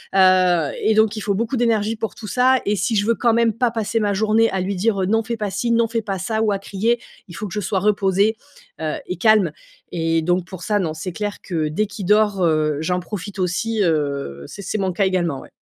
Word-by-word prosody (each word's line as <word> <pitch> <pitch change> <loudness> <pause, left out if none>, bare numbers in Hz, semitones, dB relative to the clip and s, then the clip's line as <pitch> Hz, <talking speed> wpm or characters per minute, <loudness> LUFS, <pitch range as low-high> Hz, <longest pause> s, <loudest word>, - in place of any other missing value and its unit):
Heu 185 -4 +4
et 220 - +3
donc 220 0 +3
il - - -3
faut 200 0 0
beaucoup 230 +6 -1
d'énergie 225 -2 +1
pour 220 0 -4
tout 215 - -9
ça 255 +3 +3
et 205 - +1
si 215 +5 0
je 205 -1 +2
veux 230 +1 +2
quand 235 -2 +2
même 230 0 +3
pas 245 +1 +1
passer 225 0 -1
ma 205 -2 +1
journée 220 +2 +3
à 190 - -1
lui 195 +2 -2
dire, 200 +1 +1
heu: - - +1
«Non 225 +3 +2
fait 235 +1 -3
pas 210 -1 -2
ci, 235 +4 -1
non 230 0 +3
fait 230 0 -2
pas 195 -3 -4
ça.» 220 +4 -1
ou 220 -2 +2
à 195 - -1
crier, 215 +5 0 0.3
il 175 - -11
faut 210 - -5
que 175 - -9
je 210 - -1
sois 195 -1 -1
reposée, 200 +1 +2 0.5
heu, 155 -1 -1
et 180 - -3
calme. 210 -3 +4 0.4
Et 165 -1 0
donc 175 +2 0
pour 185 -1 -10
ça, 205 +5 +1
non, 165 -5 -1
c'est 160 +4 -5
clair 205 +3 -4
que 160 -5 -2
dès 190 +8 0
qu'il 200 -1 -7
dort, 210 -1 +3
heu, 155 -2 +1
j'en 180 +3 0
profite 195 +1 -7
aussi, 210 +5 -1
heu, 140 - -1
c'est - - -9
c'est 200 +3 -3
mon 190 -2 0
cas 195 +3 +1
également 175 -7 0
ouais. - - -14
200 Hz, 255 wpm, -21 LUFS, 180-220 Hz, 0.5 s, Heu